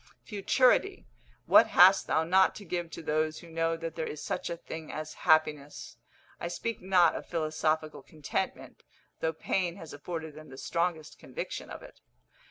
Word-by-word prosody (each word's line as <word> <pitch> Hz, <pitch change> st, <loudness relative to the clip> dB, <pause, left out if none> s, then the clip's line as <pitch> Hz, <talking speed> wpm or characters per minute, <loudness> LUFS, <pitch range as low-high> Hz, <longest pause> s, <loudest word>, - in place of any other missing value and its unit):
Futurity, 255 Hz, -, +2 dB, 0.4 s
what -, -, +7 dB
hast 190 Hz, +1 st, +6 dB
thou 160 Hz, -, +2 dB
not 185 Hz, +3 st, +4 dB
to 205 Hz, -, -9 dB
give 175 Hz, -1 st, -3 dB
to 165 Hz, -, -9 dB
those 155 Hz, 0 st, 0 dB
who 170 Hz, -, -13 dB
know 165 Hz, 0 st, 0 dB
that 165 Hz, -1 st, -5 dB
there 160 Hz, -, -3 dB
is 150 Hz, -, -6 dB
such -, -, -3 dB
a 170 Hz, -, -4 dB
thing 160 Hz, -1 st, -8 dB
as 155 Hz, 0 st, -6 dB, 0.2 s
happiness! 150 Hz, -2 st, +1 dB, 0.4 s
I -, -, -3 dB
speak 230 Hz, +6 st, -4 dB
not 180 Hz, -3 st, +4 dB
of -, -, -6 dB
philosophical 155 Hz, -1 st, -1 dB
contentment, 155 Hz, -4 st, -5 dB, 0.4 s
though 160 Hz, -, 0 dB
pain 175 Hz, +2 st, -1 dB
has 165 Hz, -5 st, -10 dB
afforded 160 Hz, +1 st, -6 dB
them 155 Hz, +1 st, -12 dB
the 130 Hz, -, -11 dB
strongest 170 Hz, 0 st, -2 dB
conviction -, -, -6 dB
of -, -, -9 dB
it. -, -, -15 dB
165 Hz, 170 wpm, -29 LUFS, 155-180 Hz, 0.4 s, what